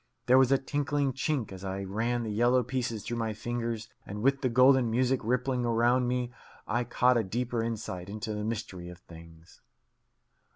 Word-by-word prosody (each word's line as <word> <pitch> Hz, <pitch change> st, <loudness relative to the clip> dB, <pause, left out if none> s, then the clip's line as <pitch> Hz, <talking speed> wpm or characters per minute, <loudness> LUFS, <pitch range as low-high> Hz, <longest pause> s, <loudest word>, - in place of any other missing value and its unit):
There 130 Hz, +1 st, +6 dB
was 130 Hz, 0 st, +4 dB
a 135 Hz, -, +6 dB
tinkling 145 Hz, 0 st, -1 dB
chink 135 Hz, -5 st, -1 dB
as 95 Hz, 0 st, -9 dB
I 95 Hz, 0 st, -3 dB
ran 115 Hz, +5 st, -1 dB
the 110 Hz, -, -3 dB
yellow 120 Hz, +4 st, +3 dB
pieces 120 Hz, -3 st, -3 dB
through 120 Hz, -, -4 dB
my 110 Hz, -1 st, -1 dB
fingers, 115 Hz, 0 st, -3 dB, 0.2 s
and 105 Hz, +2 st, -6 dB
with 135 Hz, +1 st, +3 dB
the 130 Hz, -, +1 dB
golden 125 Hz, 0 st, +5 dB
music 125 Hz, +3 st, +2 dB
rippling 125 Hz, +2 st, 0 dB
round 120 Hz, +1 st, +2 dB
me 125 Hz, 0 st, -1 dB, 0.3 s
I 120 Hz, +3 st, -1 dB
caught 125 Hz, +1 st, +3 dB
a 115 Hz, -, +2 dB
deeper 120 Hz, +4 st, -2 dB
insight 105 Hz, -5 st, -4 dB
into 110 Hz, +1 st, -4 dB
the 105 Hz, 0 st, -3 dB
mystery 95 Hz, -5 st, -4 dB
of 90 Hz, -, -10 dB
things. 85 Hz, -1 st, -15 dB
120 Hz, 180 wpm, -29 LUFS, 105-125 Hz, 0.3 s, There